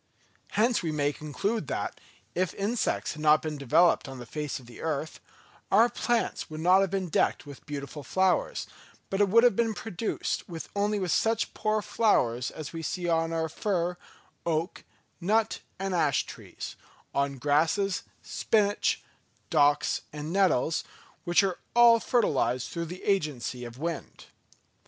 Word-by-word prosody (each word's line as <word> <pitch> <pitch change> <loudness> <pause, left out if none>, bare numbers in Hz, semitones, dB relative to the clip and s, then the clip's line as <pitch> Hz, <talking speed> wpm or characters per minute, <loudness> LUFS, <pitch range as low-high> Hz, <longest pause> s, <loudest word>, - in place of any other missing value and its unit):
Hence, 230 +3 +3
we 165 - -2
may 145 -1 0
conclude 200 +10 -2
that, - - -3 0.3
if 185 -2 -1
insects 215 +4 -1
had 155 - -9
not 155 0 +5
been 155 -2 -4
developed 155 +4 +4
on 135 - -8
the 120 - -8
face 150 +3 -4
of 130 - -15
the 120 -1 -12
earth, 155 -1 -3 0.5
our 225 +5 +6
plants 240 -1 -1
would 155 0 -6
not 185 +3 +6
have 195 - +1
been 190 -1 -1
decked 160 - +1
with 140 -1 -12
beautiful 145 0 -6
flowers, 185 +6 +1 0.5
but 195 0 +2
would 230 +4 +6
have 240 -5 +5 0.2
produced 220 0 -3 0.3
only 205 -1 0
such 225 +7 +1
poor 215 0 0
flowers 125 - +2
as 155 0 -8
we 165 - -4
see 175 +3 -3
on 165 -1 +1
our 165 -1 0
fir, 180 +1 -1 0.5
oak, 165 +3 -2 0.4
nut 215 +5 +1 0.2
and 195 0 -2
ash 155 -6 +2
trees, - - -8 0.4
on 140 0 0
grasses, 160 +8 +1 0.2
spinach, 205 -2 +1 0.5
docks 145 0 +3
and 150 +2 -5
nettles, 180 -6 +2 0.4
which 175 +3 +4
are 190 -2 -1 0.2
all 235 -1 +7
fertilised 135 - +1
through 170 -1 -3
the 180 +3 -8
agency 145 - -1
of 120 -1 -8
the 130 - -13
wind. 170 0 -5
170 Hz, 150 wpm, -28 LUFS, 150-200 Hz, 0.5 s, all